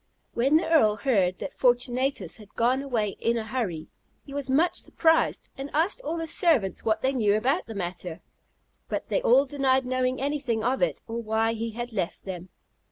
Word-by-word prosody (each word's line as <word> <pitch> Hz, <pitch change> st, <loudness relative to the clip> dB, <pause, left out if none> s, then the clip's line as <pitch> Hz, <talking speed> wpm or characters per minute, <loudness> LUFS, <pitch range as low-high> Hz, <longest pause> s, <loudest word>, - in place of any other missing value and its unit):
When 270 Hz, +6 st, +3 dB
the 325 Hz, -, -1 dB
Earl 260 Hz, -11 st, +4 dB
heard 195 Hz, -8 st, +1 dB
that -, -, -6 dB
Fortunatus 245 Hz, -, 0 dB
had 210 Hz, -2 st, -16 dB
gone 250 Hz, +3 st, +2 dB
away 235 Hz, -7 st, -1 dB
in 235 Hz, 0 st, +1 dB
a 220 Hz, -, -3 dB
hurry, 215 Hz, -10 st, -3 dB, 0.4 s
he 275 Hz, -, -10 dB
was 280 Hz, -2 st, -3 dB
much 320 Hz, +6 st, +2 dB
surprised, 325 Hz, -1 st, +2 dB
and 270 Hz, +1 st, -6 dB
asked 345 Hz, +10 st, +2 dB
all 335 Hz, -8 st, -3 dB
his 330 Hz, -1 st, -1 dB
servants 270 Hz, -, +2 dB
what 220 Hz, -1 st, 0 dB
they 265 Hz, +1 st, +2 dB
knew 210 Hz, -5 st, +2 dB
about 265 Hz, +10 st, 0 dB
the 225 Hz, -, -7 dB
matter, 175 Hz, -2 st, -5 dB, 0.7 s
but -, -, -3 dB
they -, -, +1 dB
all 270 Hz, -, +5 dB
denied 265 Hz, -2 st, +1 dB
knowing 255 Hz, 0 st, 0 dB
anything 270 Hz, -5 st, -1 dB
of 255 Hz, +3 st, 0 dB
it, 265 Hz, -, 0 dB
or 230 Hz, +1 st, -4 dB
why 225 Hz, 0 st, +1 dB
he 230 Hz, 0 st, -3 dB
had 240 Hz, +1 st, -6 dB
left 185 Hz, -5 st, -3 dB
them. 185 Hz, -1 st, -7 dB
245 Hz, 190 wpm, -26 LUFS, 215-275 Hz, 0.7 s, all